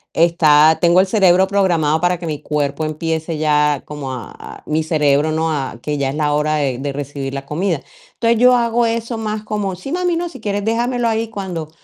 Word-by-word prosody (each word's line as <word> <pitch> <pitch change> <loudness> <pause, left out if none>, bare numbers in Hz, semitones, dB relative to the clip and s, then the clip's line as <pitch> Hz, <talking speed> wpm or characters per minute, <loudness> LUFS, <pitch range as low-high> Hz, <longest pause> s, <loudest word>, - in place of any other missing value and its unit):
está 160 -2 +5
tengo 175 0 +4
el 190 - +3
cerebro 190 -2 +4
programado 170 -6 +1
para 175 +1 +1
que 170 - -6
mi 150 -2 -3
cuerpo 150 0 -2
empiece 160 +1 -3
ya 150 -2 +2
como 145 -3 -6
a 120 -4 -9
mi 155 +1 0
cerebro, 150 -1 +2
¿no? 160 +1 0
A 135 -5 -3
que 150 +2 -3
ya 140 -1 -1
es 135 - -4
la 150 -1 0
hora 150 +1 +1
de 135 -4 -1
de 140 +2 -4
recibir 140 -1 -5
la 135 0 -5
comida. 180 +6 -1 0.4
Entonces, 230 0 +2
yo 250 +1 +6
hago 235 0 +1
eso 230 +1 -2
más 215 -1 -3
como: 205 -3 -3
"Sí, 185 +10 -8
mami, 355 0 0
no, 345 +1 -2
si 265 - -11
quieres 205 -2 -2
déjamelo 240 +2 0
ahí 225 0 -1
cuando 185 -7 -5
165 Hz, 210 wpm, -18 LUFS, 150-215 Hz, 0.4 s, yo